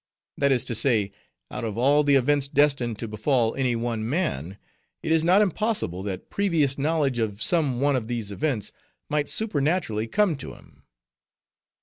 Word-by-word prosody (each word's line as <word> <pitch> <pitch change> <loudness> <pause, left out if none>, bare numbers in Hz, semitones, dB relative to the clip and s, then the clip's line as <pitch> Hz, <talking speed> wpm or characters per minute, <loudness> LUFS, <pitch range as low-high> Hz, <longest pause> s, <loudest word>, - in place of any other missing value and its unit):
That 140 -1 +1
is 125 -3 +3
to - - -3
say, 110 -4 +2 0.4
out 125 - -5
of 110 -2 -4
all 140 +5 +3
the 145 -1 +3
events 140 +1 +2
destined 140 -6 +1
to 115 - -4
befall 110 +2 0
any 130 -3 0
one 115 -1 -3
man, 100 - -2 0.5
it 160 - -2
is 160 -1 +3
not 185 +5 +5
impossible 200 - -1
that 95 -2 -6
previous 165 -9 +1
knowledge 145 -4 0
of 105 -3 -2
some 145 -4 +1
one 140 +1 +2
of 120 -4 -2
these 115 -4 -3
events 125 -1 -2 0.4
might 150 -1 -1
supernaturally 150 - -1
come 200 - +1
to - - -8
him. - - -21
135 Hz, 165 wpm, -25 LUFS, 115-150 Hz, 0.5 s, not